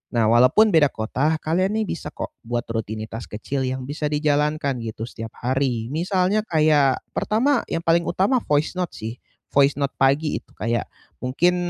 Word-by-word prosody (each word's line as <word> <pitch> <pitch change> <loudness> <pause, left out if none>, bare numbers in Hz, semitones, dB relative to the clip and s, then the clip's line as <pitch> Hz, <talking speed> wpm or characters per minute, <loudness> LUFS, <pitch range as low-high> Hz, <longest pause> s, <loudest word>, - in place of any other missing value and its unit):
nah, 115 -2 +3
walaupun 130 - +5
beda 155 -4 +5
kota, 135 +8 0
kalian 185 +6 +1
nih 220 -1 0
bisa 165 - -4
kok - - -5
buat 120 0 -2
rutinitas 110 0 -5
kecil 130 +5 -3
yang 130 0 -3
bisa 150 +3 -3
dijalankan 150 -2 +1
gitu 110 -1 -5
setiap 115 -2 -8
hari. 125 -2 0
Misalnya 185 +5 +1
kayak 150 -4 +3
pertama 245 +5 +1
yang 165 - -3
paling 170 0 +3
utama 195 +9 +2
voice 150 +4 +1
note 180 - -2
sih, 115 +2 -6 0.3
voice 140 0 +4
note 140 0 -1
pagi 140 +3 +2
itu - - -30
kayak 115 +3 -1 0.3
mungkin 165 +8 +2
145 Hz, 165 wpm, -23 LUFS, 120-165 Hz, 0.3 s, walaupun